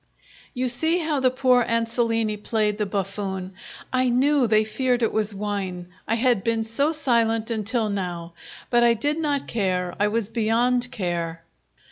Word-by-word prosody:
You 255 +1 0
see 320 +8 +1
how 310 -4 -1
the 260 -1 +4
poor 255 -1 +3
Ansolini 230 -1 0
played 210 0 -1
the 210 - 0
buffoon. 195 -1 -4 0.4
I 255 0 +2
knew 265 +1 +3
they 215 0 +4
feared 245 +3 0
it 225 - +1
was 215 -1 0
wine, 195 -3 -4 0.2
I 225 - +1
had 235 -4 +2
been 230 -1 0
so 255 +8 0
silent 235 -6 +1
until 225 +1 -1
now; 175 -4 -4 0.4
but 240 -1 +5
I 235 -1 +5
did 290 +7 -1
not 290 -3 -1
care, 185 -5 -1
I 205 - +3
was 220 0 -1
beyond 240 +2 +1
care. 170 -6 -3
225 Hz, 160 wpm, -24 LUFS, 205-250 Hz, 0.4 s, but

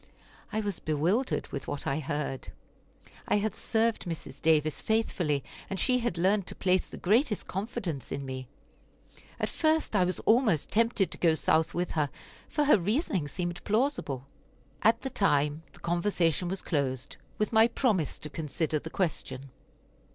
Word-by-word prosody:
I 220 - 0
was 205 -3 -3
bewildered 170 - 0
with 135 -2 -5
what 145 -1 -4
I 135 +3 0
heard. 145 -2 -3 0.8
I - - +3
had 205 -1 +1
served 225 0 0
Mrs. 155 -5 -6
Davis 155 -2 +3
faithfully, 175 -10 +1 0.3
and 195 - -3
she 250 -1 +3
had 235 -8 -1
learned 190 +2 +2
to - - -7
place 185 0 +1
the - - -8
greatest 220 +3 +2
confidence 195 - -4
in 140 0 -3
me. 130 -1 -5 0.9
At - - 0
first 315 -6 +1
I 190 - +5
was 180 - -1
almost 220 - +3
tempted 225 -3 +2
to - - -7
go 165 -2 +4
South 160 0 +2
with 175 0 -1
her, 150 -3 +1 0.4
for 300 - +1
her 285 -7 +5
reasoning 200 - 0
seemed 175 +3 -4
plausible. 210 - 0 0.6
At 225 +3 +4
the 265 - -3
time 150 - +2
the - - -16
conversation 175 -1 +1
was 190 +1 -3
closed, 135 -4 -2 0.2
with 215 +2 0
my 220 +1 +7
promise 220 - 0
to 150 - -7
consider 155 0 -1
the 160 - -7
question. 140 -7 -3
180 Hz, 160 wpm, -29 LUFS, 150-220 Hz, 0.9 s, my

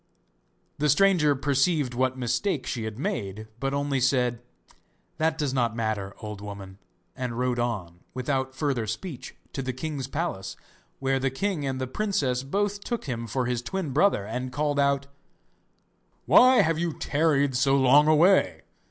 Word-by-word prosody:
The 150 +1 +2
stranger 155 -2 +4
perceived 140 0 +1
what 130 +1 0
mistake 125 - -1
she 115 -3 -3
had 110 -1 -5
made, 110 - -4
but 135 +1 -1
only 140 -1 0
said: 125 -2 +1 0.8
'That 160 0 +1
does 145 -4 -1
not 120 -4 0
matter, 110 -4 -2
old 105 -2 -7
woman,' 100 -2 -9 0.4
and 125 -2 -4
rode 125 -1 0
on, 100 -8 -3 0.2
without 130 0 -2
further 130 -6 -1
speech, 125 - -6 0.2
to 135 - -3
the 130 -1 -3
king's 140 0 -4
palace, 95 - -3 0.4
where 135 0 0
the 135 +1 0
king 150 +1 -2
and 130 -1 -2
the 130 - -1
princess 135 -5 -1
both 200 +8 -2
took 235 -2 -3
him 115 -3 -4
for 130 +3 -1
his 120 -1 -1
twin 160 +4 -3
brother, 145 - +2
and 125 +4 -4
called 145 +1 0
out: 140 -1 +2 1.2
'Why 255 0 +7
have 160 0 0
you 170 -2 -1
tarried 145 -3 +1
so 135 +2 +3
long 140 +3 +5
away? 170 +5 +4
135 Hz, 160 wpm, -26 LUFS, 120-150 Hz, 1.2 s, Why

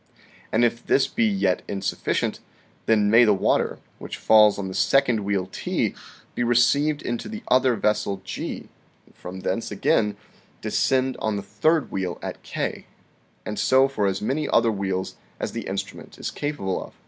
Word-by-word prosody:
And 120 +2 +4
if 120 0 -1
this 135 - +3
be 230 - 0
yet 200 -2 +1
insufficient, 95 -1 -2 0.5
then 105 -2 +3
may 115 +2 +7
the 105 -3 +4
water, 95 - +1 0.2
which - - -7
falls 105 -1 +5
on 100 -1 -4
the 95 - -6
second 125 +1 +3
wheel 100 -2 -1
T, - - -1 0.4
be - - -3
received 140 +5 +3
into 120 -1 -3
the 220 +1 -7
other 130 -1 +4
vessel 105 -2 0
G, - - -5 0.4
and - - -24
from 95 +1 -8
thence 95 +6 -2
again 105 0 +1 0.4
descend 130 -1 +1
on 110 -1 -1
the 100 - -4
third 155 +9 +1
wheel 95 -2 -3
at - - -6
K; - - -4 0.6
and 105 - -4
so 130 +1 +4
for 110 -7 -1
as 95 +1 -2
many 145 +7 -1
other 115 - +3
wheels 95 -2 -3 0.2
as - - -3
the - - -5
instrument - - -6
is - - -4
capable 145 -11 -3
of. - - -14
110 Hz, 170 wpm, -24 LUFS, 100-130 Hz, 0.6 s, may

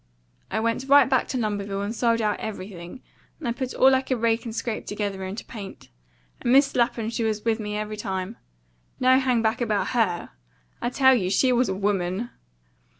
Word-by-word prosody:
"I - - -1
went 230 +4 -1
right 280 -2 +7
back 260 -1 +1
to 260 - -3
Lumberville 205 -3 -2
and 210 - -3
sold 230 -1 +1
out 210 -1 0
everything, 190 0 -7 0.4
and 240 -6 -3
put 260 0 -4
all 265 +1 +6
I 260 - +3
could 260 -2 -2
rake 230 +1 +1
and 225 -1 -5
scrape 230 -3 -3
together 205 -2 -3
into 190 +4 -6
paint. 200 -4 -9 0.5
And 240 - 0
Mis' 275 +2 +5
Lapham 235 -2 +1 0.2
was 215 -1 -2
with 225 0 +1
me 210 -1 -3
every 215 0 -4
time. 190 +1 -4 0.6
No 255 +1 +5
hang 250 -3 +1
back 220 +2 0
about 215 -4 0
HER. 205 -8 0 0.5
I 240 - 0
tell 265 +1 +5
you 195 -8 +1
she 230 +7 +3
was 245 -1 +2
a 190 - -1
WOMAN!" 195 +3 -1
225 Hz, 190 wpm, -25 LUFS, 205-250 Hz, 0.6 s, right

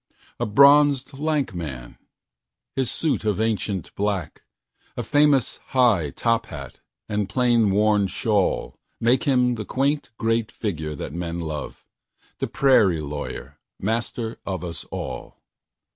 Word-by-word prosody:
A - - 0
bronzed, 140 +3 +5
lank 150 -6 0
man! 70 -9 -7 0.8
His 130 -3 0
suit 155 -7 -1
of 105 -2 0
ancient 105 -5 -1
black,A 90 -11 -5
famous 145 -4 +3 0.2
high 105 - +4
top 115 - 0
hat 70 -4 -9 0.3
and 105 -2 -1
plain 120 -1 +3
worn 105 0 +3
shawlMake 115 +4 0
him 125 -3 +3
the 110 -3 -5
quaint 140 +5 0
great 115 -1 0
figure 80 -8 -4
that 75 - -6
men 85 0 -4
love, 80 -3 -6 0.5
The - - -1
prairie 105 - +4
lawyer, 75 -1 -6 0.2
master 115 +2 -2
of 95 -2 -4
us 85 -1 -6
all. - - -6
110 Hz, 120 wpm, -24 LUFS, 85-125 Hz, 0.8 s, bronzed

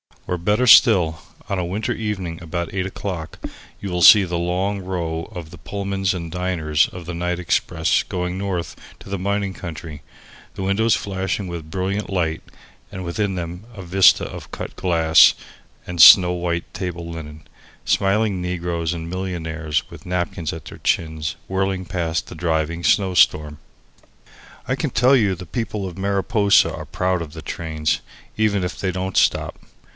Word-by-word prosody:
Or, 90 - -2
better 105 +8 +1
still, 90 -10 +6 0.3
on 100 - -1
a 90 - -1
winter 100 +5 -2
evening 95 -7 -4
about 85 0 -4
eight 95 -1 -1
o'clock 95 -4 -5 0.4
you 100 - -4
will 90 0 -1
see 100 +4 +9
the 85 -2 -2
long 95 +4 -1
row 85 -3 -4
of 80 -3 -7
the - - -11
Pullmans 100 -2 -2
and 85 -3 -6
diners 85 -4 +1
of 90 -2 -10
the 85 - -5
night 90 +1 -2
express 85 -2 +1
going 90 0 -3
north 95 -3 -3 0.2
to - - -13
the 100 -1 -3
mining 100 0 -1
country, 80 -4 -8 0.5
the - - -4
windows 105 +4 +2
flashing 95 0 -3
with 85 -3 -7
brilliant 95 +4 -2
light, 85 -5 -1 0.5
and 95 - -6
within 95 +3 -2
them 90 +3 -6
a 95 - -8
vista 95 +2 +5
of - - -9
cut - - -7
glass 80 -3 +5 0.5
and 90 -2 0
snow 90 +4 +10
white 85 -1 -3
table 90 -3 -5
linen, 80 -2 -8 0.4
smiling 100 -1 +1
negroes 85 -2 -2
and 85 -1 -6
millionaires 80 -5 -3
with - - -12
napkins 90 -2 -2
at 80 -3 -9
their - - -10
chins 80 -2 -1
whirling 95 0 -1
past 85 -3 -2
in - - -14
the 80 - -10
driving 80 0 -1
snowstorm. 75 -7 +3 1.1
I - - +1
can - - -2
tell 130 +3 +4
you 105 -7 +2
the 90 +1 -9
people 105 +1 -3
of 90 -1 -7
Mariposa 100 +1 +2
are - - -7
proud 90 -1 -1
of 80 -3 -7
the 80 -1 -9
trains, 80 -2 -2 0.4
even 105 -3 +1
if 90 - -4
they 95 - -1
don't 95 0 -3
stop! - - +1
90 Hz, 165 wpm, -21 LUFS, 85-95 Hz, 1.1 s, snow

